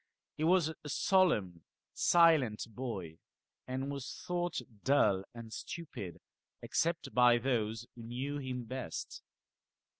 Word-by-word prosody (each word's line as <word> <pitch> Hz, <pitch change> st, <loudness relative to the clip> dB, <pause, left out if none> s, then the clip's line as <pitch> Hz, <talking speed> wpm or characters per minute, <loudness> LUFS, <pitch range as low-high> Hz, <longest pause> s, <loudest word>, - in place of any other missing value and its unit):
He 155 Hz, -, -3 dB
was 170 Hz, -1 st, +4 dB
a 155 Hz, -2 st, -9 dB
solemn 110 Hz, -, +2 dB, 0.3 s
silent 160 Hz, -11 st, +4 dB
boy, 100 Hz, -9 st, -5 dB, 0.5 s
and 130 Hz, +2 st, -2 dB
was 140 Hz, -2 st, -6 dB
thought 175 Hz, 0 st, -1 dB, 0.2 s
duU 105 Hz, -9 st, +4 dB
and 115 Hz, -1 st, -8 dB
stupid, 105 Hz, -, -6 dB, 0.4 s
except 165 Hz, 0 st, 0 dB
by 125 Hz, -1 st, +6 dB
those 115 Hz, -3 st, -1 dB
who 120 Hz, -, -10 dB
knew 130 Hz, +5 st, -4 dB
him 130 Hz, -2 st, -4 dB
best. 130 Hz, +2 st, -5 dB
130 Hz, 115 wpm, -33 LUFS, 115-155 Hz, 0.5 s, by